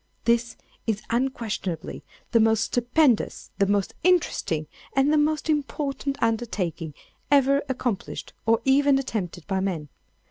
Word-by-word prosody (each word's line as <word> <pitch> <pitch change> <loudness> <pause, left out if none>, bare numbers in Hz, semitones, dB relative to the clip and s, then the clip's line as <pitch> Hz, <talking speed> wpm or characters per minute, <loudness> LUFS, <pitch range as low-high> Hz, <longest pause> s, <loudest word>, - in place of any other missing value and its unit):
This 235 0 +2 0.3
is 215 -2 -1
unquestionably 230 -8 -2 0.3
the 230 - +5
most 220 0 +4
stupendous, 245 0 +1
the 200 - +4
most 200 -1 +1
interesting, 320 - +2 0.3
and 275 +2 +4
the - - +4
most 305 +1 +1
important 285 -2 -1
undertaking, 190 -9 -1 0.3
ever 275 0 +4
accomplished 245 -5 -3
or 225 +1 +4
even 275 +1 +4
attempted 195 -10 -4
by 190 -1 -1
man. 175 -6 -2
235 Hz, 120 wpm, -25 LUFS, 200-275 Hz, 0.3 s, the